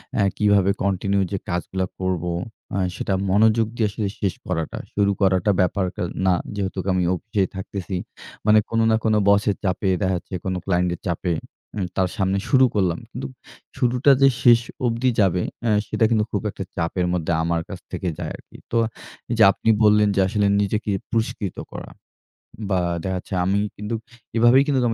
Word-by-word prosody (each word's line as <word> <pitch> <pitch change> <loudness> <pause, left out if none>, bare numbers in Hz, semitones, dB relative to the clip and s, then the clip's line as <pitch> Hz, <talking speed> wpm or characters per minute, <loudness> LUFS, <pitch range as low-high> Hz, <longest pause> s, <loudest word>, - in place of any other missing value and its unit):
অ্যা 100 - +3
কিভাবে 100 -2 +4
কন্টিনিউ 100 0 +1
যে 100 - -1
কাজগুলা 90 +2 -2
করবো? 90 -2 -1 0.4
আ - - 0 0.2
সেটা 95 - -2 0.2
মনোযোগ 110 +3 +4
দিয়ে 110 -3 +1
আসলে 105 0 -2
শেষ 100 -3 0
করাটা। 80 -1 -2 0.2
শুরু 100 -1 +2
করাটা 95 +1 +3
ব্যাপারটা 90 0 -1 0.2
না। 95 - +4 0.2
যেহেতু 95 -2 -3
আমি 90 -1 +1
অফিসে 105 +2 -1
থাকতেছি, 95 0 -5 0.5
মানে 110 0 +6
কোনো 115 0 +1
না - - +4
কোনো 110 -1 +3
বসের 100 0 +3
চাপে 95 +1 0
দেখা 95 -1 +1
যাচ্ছে 95 +2 -7
কোনো 95 -1 -1
ক্লায়েন্টের 90 -2 0
চাপে, 85 0 -1 0.4
হুম? 100 -4 -2
তার 95 -2 +1
সামনে 95 0 +1
শুরু 130 -1 +6
করলাম। 90 -4 +1
কিন্তু - - -5 0.5
শুরুটা 125 +3 +3
যে 135 - +8 0.2
শেষ 120 -3 +7 0.3
অবধি 120 +2 +1
যাবে 90 -2 +2 0.2
অ্যা 115 - +2 0.2
সেটা 115 - +2
কিন্তু 110 -2 +2
খুব 100 - -1
একটা 95 - -6
চাপের 85 +2 -1
মধ্যে 85 -2 -1
আমার 85 0 0
কাছ 95 - -6
থেকে 95 - -3
যায় - - -4
আরকি। - - -16
তো 115 - +1 0.5
এইযে 115 -2 +4
আপনি 110 - -2
বললেন, 105 0 +5
যে - - +2
আসলে 100 0 +1
নিজেকে 105 +1 -1 0.2
পুরস্কৃত 110 -4 -2 0.2
করা। - - -8 0.8
বা 95 -2 +2 0.2
দেখা 95 -1 -2
যাচ্ছে, 95 - -10
আমি 100 +2 +2 0.2
কিন্তু 105 +3 -3 0.4
এভাবেই 120 +4 +6
কিন্তু 140 -3 +2
100 Hz, 170 wpm, -22 LUFS, 95-110 Hz, 0.8 s, যে